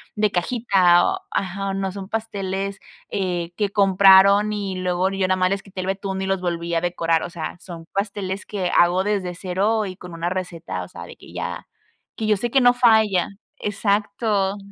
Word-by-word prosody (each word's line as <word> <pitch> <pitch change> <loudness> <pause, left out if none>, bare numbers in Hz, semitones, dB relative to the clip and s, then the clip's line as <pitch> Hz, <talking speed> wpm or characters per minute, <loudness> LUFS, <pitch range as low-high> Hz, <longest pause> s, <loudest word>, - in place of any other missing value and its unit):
de 210 -1 +1
cajita", 185 -3 +3
o 380 0 -1
ajá, 195 +1 -2
no 195 -1 -2
son 195 0 -8
pasteles, 195 -3 -3 0.3
eh, 175 -3 -2
que 205 -2 0
compraron 200 +1 +5
y 200 -2 -3
luego 185 +1 0
yo 195 -1 0
nada 185 - +2
más 185 0 +2
les 195 0 -1
quité 190 -1 -7
el 185 - -5
betún 195 0 -3
y - - -2
los 195 -1 -1
volví 170 -1 -3
a 165 - +1
decorar. 165 -2 0
O - - -5
sea, 170 0 -6
son 170 -3 -10
pasteles 200 -1 -3
que 190 -4 -2
hago 175 +2 +4
desde 195 -3 -2
0 200 +5 0
y 185 -2 -6
con 180 -2 -10
una 170 +1 -2
receta, 170 - -4
o - - -9
sea, 85 - -10
de 85 - -11
que - - -15
ya - - -5 0.5
que 220 - -2
yo 215 - +4
sé 240 +4 -3
que 270 - +4
no 245 0 +6
falla 220 -7 +3 0.3
exacto. 205 0 0
195 Hz, 195 wpm, -22 LUFS, 180-205 Hz, 0.5 s, no